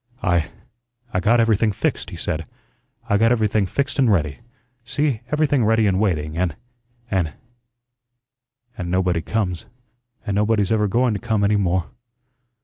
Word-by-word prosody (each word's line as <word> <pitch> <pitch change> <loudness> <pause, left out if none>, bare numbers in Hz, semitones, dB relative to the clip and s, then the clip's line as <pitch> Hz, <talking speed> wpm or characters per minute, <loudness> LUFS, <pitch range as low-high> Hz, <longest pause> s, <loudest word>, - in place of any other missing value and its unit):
"I 85 -3 +1 0.6
I 90 - +1
got 115 +6 +3
everything 110 -1 +3
fixed," 95 - -2
he - - -8
said. 80 -2 -4 0.6
"I 105 - +3
got 115 +2 +4
everything 110 -4 +2
fixed 140 +8 -2
an' 130 -4 +4
ready. 80 -8 +1 0.5
See, 135 -1 -1
everything 150 -4 +2
ready 110 0 +3
an' 95 -1 +1
waiting, 80 -7 0
an' 85 -2 -1 0.6
an' 90 -6 0 1.5
an' 90 -1 -3
nobody 90 -2 +1
comes, 90 -2 -2 0.6
an' 100 - -2
nobody's 105 0 +1
ever 105 -2 +2
going 120 +3 +2
to 100 - -3
come 110 -1 0
any 105 +1 +3
more. 95 -3 0
105 Hz, 145 wpm, -22 LUFS, 90-115 Hz, 1.5 s, got